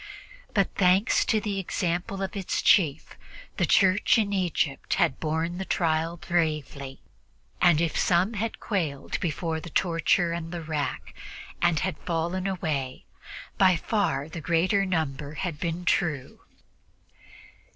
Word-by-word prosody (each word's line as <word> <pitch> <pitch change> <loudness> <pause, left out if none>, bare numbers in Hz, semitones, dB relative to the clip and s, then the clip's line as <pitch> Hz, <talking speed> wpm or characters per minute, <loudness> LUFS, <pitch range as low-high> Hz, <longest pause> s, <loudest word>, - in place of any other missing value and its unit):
But, 195 -3 +2
thanks 190 +4 +3
to 220 - +2
the 205 -2 -3
example 180 +1 -2
of 195 - -4
its 195 -2 -2
chief, 155 -6 +3 0.4
the - - +1
Church 195 +4 +4
in 205 -2 +1
Egypt 170 -7 -1
had - - +1
borne 160 +3 -2
the - - -2
trial 165 -1 0
bravely, 150 -5 -2 0.6
and 175 -4 +5
if 165 -1 0
some 180 +5 +2
had 220 +2 -3
quailed 160 -10 -2
before 165 -2 -2
the 170 - -9
torture 170 +1 +1
and 170 -1 -4
the 175 -2 -5
rack 150 -4 -3 0.5
and 170 -3 +2
had 185 +2 -2
fallen 175 +3 -2
away, 150 -8 -3 0.5
by 185 -2 +6
far 170 -6 -1
the 160 0 -7
greater 185 +5 +2
number 150 -4 -2
had 165 -2 -4
been 170 +1 -3
true. 155 -9 0
170 Hz, 135 wpm, -26 LUFS, 155-190 Hz, 0.6 s, by